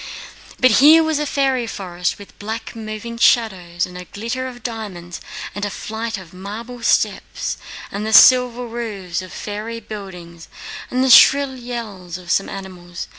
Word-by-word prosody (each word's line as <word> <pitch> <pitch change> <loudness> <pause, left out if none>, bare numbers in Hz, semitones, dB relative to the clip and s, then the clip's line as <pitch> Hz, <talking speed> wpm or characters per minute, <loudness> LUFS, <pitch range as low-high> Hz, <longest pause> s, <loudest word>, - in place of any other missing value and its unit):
"But 255 -1 +5
here 315 +3 +8
was 315 -2 0
a 300 - -1
fairy 270 -4 +1
forest 180 -4 -3
with 205 - -14
black 220 +3 -5
moving 225 +1 -6
shadows, 180 -8 +2
and 180 - -12
a 180 0 -7
glitter 235 +7 -4
of 245 -2 -10
diamonds 195 -7 -6 0.3
and 205 +1 -5
a 205 - 0
flight 220 +2 -4
of 185 -3 -12
marble 220 +6 -8
steps - - 0 0.3
and 200 +1 -4
the 220 - -2
silver 250 +2 +6
roofs 210 -7 -4
of 185 -1 -10
fairy 215 +2 -5
buildings 180 -6 -9 0.4
and 255 +1 +1
the 265 - +3
shrill 275 +3 +7
yells 220 -8 -6
of 175 -1 -7
some 195 - +1
animals. 180 -3 -8
215 Hz, 160 wpm, -20 LUFS, 185-240 Hz, 0.4 s, here